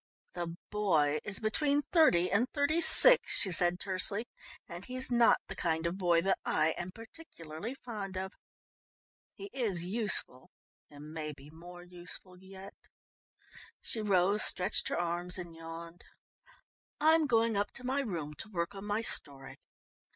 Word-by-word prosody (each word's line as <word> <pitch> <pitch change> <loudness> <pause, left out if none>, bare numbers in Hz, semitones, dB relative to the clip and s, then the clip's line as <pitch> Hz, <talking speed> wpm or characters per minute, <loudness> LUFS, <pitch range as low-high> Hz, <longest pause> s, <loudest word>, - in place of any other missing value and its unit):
"The 170 -1 -6
boy 155 -8 +1
is 195 -3 -2
between 285 +6 0
thirty 180 - +3
and 230 +6 +1
thirty 300 +3 0
six," - - +8
she 195 - +1
said 175 +1 +3
tersely. 200 +3 -1 0.4
"And 175 0 -9
he's 255 +3 -4
not 240 -1 +4
the - - -8
kind 160 -1 -2
of 170 +3 -3
boy 175 -2 +2
that 195 0 0
I 155 +1 +1
am 175 - -6
particularly 225 - -10
fond 205 -7 -8
of. 190 +1 -5 1.0
He 400 0 -10
is 200 -10 0
useful 190 - +1 0.4
and 150 +1 -12
may 155 -1 -6
be 140 +2 -16
more 175 +2 -13
useful 180 +1 -8
yet." 190 +1 -13 1.1
She 225 - -3
rose, 200 0 +2
stretched 185 +3 +2
her - - -3
arms 175 +1 -2
and 175 -2 -8
yawned. 165 +1 -10 1.0
"I'm 315 0 +3
going 230 -3 +1
up 205 +1 -1
to 250 - -9
my 265 +3 -1
room 170 - -5
to 220 - -8
work 170 -1 -4
on 195 0 -9
my 210 +2 -2
story. 140 -11 -3
190 Hz, 150 wpm, -31 LUFS, 170-225 Hz, 1.1 s, six